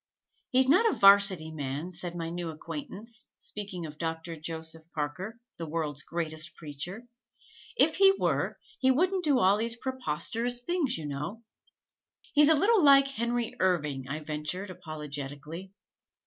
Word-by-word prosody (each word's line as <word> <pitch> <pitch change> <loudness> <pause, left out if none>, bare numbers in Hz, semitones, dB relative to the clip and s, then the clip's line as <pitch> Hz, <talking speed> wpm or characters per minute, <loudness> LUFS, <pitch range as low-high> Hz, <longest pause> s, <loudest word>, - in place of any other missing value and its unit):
"He's 260 0 +4
not 385 - +5
a - - -3
'Varsity 195 -5 +6
man," 145 +3 -4
said 175 0 -6
my 165 -1 -4
new 175 -1 -4
acquaintance, 225 - -7
speaking 195 -5 -5
of 150 -1 -9
Doctor 165 0 -3
Joseph 160 +1 -7
Parker, 180 +10 -4 0.2
the 165 - -5
world's 150 -3 -2
greatest 160 0 -3
preacher. 170 +9 -7 0.7
"If 315 -5 +4
he 390 0 +8
were, - - 0 0.2
he 260 - +3
wouldn't 365 +7 +2
do 290 -5 +3
all 195 -2 +4
these 230 +1 +1
preposterous 245 - -1
things, 310 - 0
you 160 - -6
know." 150 +11 -5 0.9
"He's 295 0 +6
a 320 - +7
little 400 +5 +4
like 275 -1 +7
Henry 235 -2 -1
Irving," 150 -8 0
I 150 +3 -4
ventured 155 +6 -3
apologetically. 150 +2 -6
180 Hz, 145 wpm, -29 LUFS, 155-245 Hz, 0.9 s, he